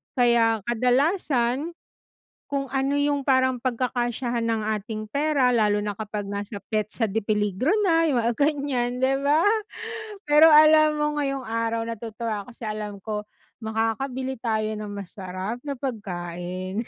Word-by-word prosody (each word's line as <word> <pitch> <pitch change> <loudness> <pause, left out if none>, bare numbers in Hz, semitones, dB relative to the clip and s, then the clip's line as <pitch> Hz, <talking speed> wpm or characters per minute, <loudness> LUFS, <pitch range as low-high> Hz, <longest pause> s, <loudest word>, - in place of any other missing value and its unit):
Kaya 235 -3 +3
kadalasan, 255 - +1 0.8
kung 275 -2 -3
ano 275 +1 0
yung 285 -1 0
parang 260 -1 +3
pagkakasyahan 240 -1 -1
ng 225 -1 0 0.2
ating 215 +1 -7
pera 285 -3 +2
lalo 210 -3 +2
na 205 - -1
kapag 210 -1 -4
nasa 200 0 -5
petsa 215 +2 -1
de 220 0 +1
peligro 210 +3 -1 0.2
na, 330 -3 +3
yung 245 -6 +1
mga 235 - +2
ganyan, 275 -4 0
di 265 - +4
ba? 290 +4 +3 0.8
Pero 300 +2 +7
alam 310 0 +7
mo, 295 - +2
ngayong 275 -2 -1
araw, 230 0 -1
natutuwa 225 -2 -4
ako 245 - -13
kasi - - -13
alam 210 -1 -5
ko, 210 -1 -4 0.4
makakabili 245 +4 -2
tayo 220 -2 -1
ng 210 -1 -6
masarap 195 +3 -6
na 285 -2 -4
pagkain. 185 -4 -4
235 Hz, 140 wpm, -25 LUFS, 215-275 Hz, 0.8 s, Pero